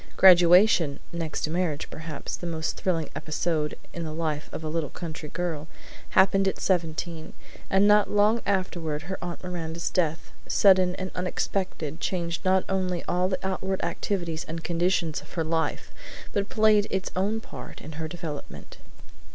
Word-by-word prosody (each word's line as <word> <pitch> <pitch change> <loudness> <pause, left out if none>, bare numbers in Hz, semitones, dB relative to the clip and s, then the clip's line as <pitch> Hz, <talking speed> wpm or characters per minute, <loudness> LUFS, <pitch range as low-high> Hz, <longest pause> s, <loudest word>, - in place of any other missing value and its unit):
Graduation 175 -4 +7
(next 165 -2 -3
to 155 - -1
marriage, 170 -4 -1
perhaps, 155 -2 -5
the 175 - -6
most 160 -1 -2
thrilling 165 -5 0
episode 155 -1 -1 0.2
in 170 - -4
the 160 - -4
life 155 -2 -2
of - - -6
a - - -3
little 155 -2 -1
country 160 -3 -7
girl) 165 -4 -3 0.5
happened 195 +1 +5
at 190 - -1
seventeen, 165 -2 -1 0.4
and 195 +1 +4
not 210 0 +5
long 210 +3 +3
afterward 175 -6 -1
her 190 +2 -5
Aunt 175 0 -5
Miranda's 170 -2 -3
death, 165 -3 0 0.2
sudden 185 -2 +5
and 185 0 -5
unexpected, 180 -3 -2
changed 170 -2 -2
not 185 0 +3
only 185 -2 -1
all 180 +1 +1
the 185 - 0
outward 190 0 -2
activities 170 -1 -2
and 165 +1 -5
conditions 170 -2 +1
of 145 - -16
her 165 - 0
life, 160 0 -1 0.4
but 200 0 0
played 215 -2 +4
its 190 -1 -2
own 200 +4 +1
part - - -10
in 155 - -9
her 160 +1 -4
development. 160 -3 -7
175 Hz, 160 wpm, -27 LUFS, 160-190 Hz, 0.5 s, Graduation